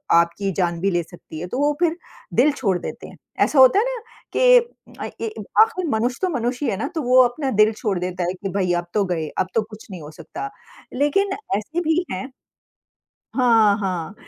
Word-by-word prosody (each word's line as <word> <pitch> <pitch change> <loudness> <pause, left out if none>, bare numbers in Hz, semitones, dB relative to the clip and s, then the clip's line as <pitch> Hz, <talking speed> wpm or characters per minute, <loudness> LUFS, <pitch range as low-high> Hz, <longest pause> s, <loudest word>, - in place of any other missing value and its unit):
आपकी 170 +4 +2
जान 175 -3 0
भी 195 - +1
ले 175 -1 0
सकती 165 -2 -11
है 175 - -5
तो 250 - -4
वो 290 +1 +2
फिर 340 -1 +1 0.4
दिल 285 +5 +4
छोड़ 200 -10 0
देते - - -7
हैं। - - -14 0.3
ऐसा 290 - +1
होता 260 +9 +7
है 440 - +2
ना 475 - -7 0.3
कि - - +1 0.9
ए - - -2 0.3
आखिर 440 -5 +2
मनुष्य 240 +1 0
तो 375 - +1
मनुष्य 245 +4 -2
ही - - +1
है 195 - -2
ना 250 +7 -2
तो 320 - 0
वो 255 +1 +6
अपना 265 +3 -1
दिल 215 - +5
छोड़ 210 -3 -2
देता 180 0 -3
है - - -2
कि 195 - -1
भाई 185 -2 0
अब 175 0 -1
तो 210 - +2
गए, 165 -4 -2
अब 185 - +1
तो 225 - +4
कुछ 215 0 -11
नहीं 180 -3 -7
हो 150 +1 -9
सकता। 155 -4 -7 0.4
लेकिन 295 +9 +1 0.3
ऐसे 315 +12 -3
भी 335 +2 +1
हैं 190 +9 -5 1.0
हाँ, 225 -5 +4
हाँ, 185 -3 -3
215 Hz, 210 wpm, -22 LUFS, 180-280 Hz, 1.0 s, होता